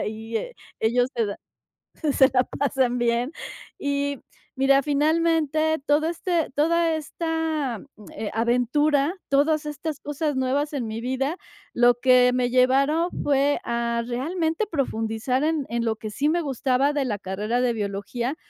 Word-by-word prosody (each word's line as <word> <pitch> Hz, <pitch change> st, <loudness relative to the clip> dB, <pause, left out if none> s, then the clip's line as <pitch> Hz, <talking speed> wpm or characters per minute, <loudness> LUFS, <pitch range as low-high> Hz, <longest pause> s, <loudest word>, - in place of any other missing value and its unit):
ahí, 220 Hz, +1 st, -4 dB
eh, -, -, -4 dB, 0.2 s
ellos 245 Hz, +3 st, +2 dB
se 230 Hz, -, +1 dB
da 200 Hz, -, -4 dB, 0.8 s
se 265 Hz, -1 st, +5 dB
la 255 Hz, -1 st, +3 dB
pasan 265 Hz, -3 st, 0 dB
bien. 240 Hz, +3 st, 0 dB, 0.5 s
"Y, 285 Hz, 0 st, -1 dB, 0.4 s
mira, 275 Hz, +1 st, +4 dB
finalmente, 315 Hz, +1 st, +2 dB
todo 295 Hz, +2 st, +3 dB
este 340 Hz, 0 st, -1 dB
toda 330 Hz, +2 st, +2 dB
esta, 315 Hz, -, -2 dB, 0.3 s
eh, 215 Hz, -, -4 dB
aventura, 275 Hz, +7 st, +2 dB
todas 300 Hz, +2 st, +2 dB
estas 300 Hz, 0 st, -5 dB
cosas 295 Hz, +1 st, -2 dB
nuevas 270 Hz, +3 st, 0 dB
en 265 Hz, -5 st, -2 dB
mi 220 Hz, +1 st, -4 dB
vida, 265 Hz, +6 st, -1 dB, 0.4 s
lo 240 Hz, 0 st, +5 dB
que 250 Hz, -1 st, +5 dB
me 250 Hz, -1 st, +1 dB
llevaron 275 Hz, +7 st, +3 dB
fue 285 Hz, 0 st, +2 dB
a 235 Hz, 0 st, -1 dB
realmente 320 Hz, -, -1 dB
profundizar 250 Hz, -, -1 dB
en 310 Hz, -3 st, 0 dB
en 235 Hz, 0 st, -2 dB
lo 225 Hz, -1 st, 0 dB
que 215 Hz, 0 st, -6 dB
sí 280 Hz, +8 st, 0 dB
me 345 Hz, +2 st, +1 dB
gustaba 270 Hz, -1 st, +1 dB
de 285 Hz, -2 st, 0 dB
la 215 Hz, -5 st, -2 dB
carrera 205 Hz, +5 st, -2 dB
de 250 Hz, -1 st, +2 dB
biología, 220 Hz, +6 st, -3 dB
275 Hz, 145 wpm, -24 LUFS, 240-305 Hz, 0.8 s, se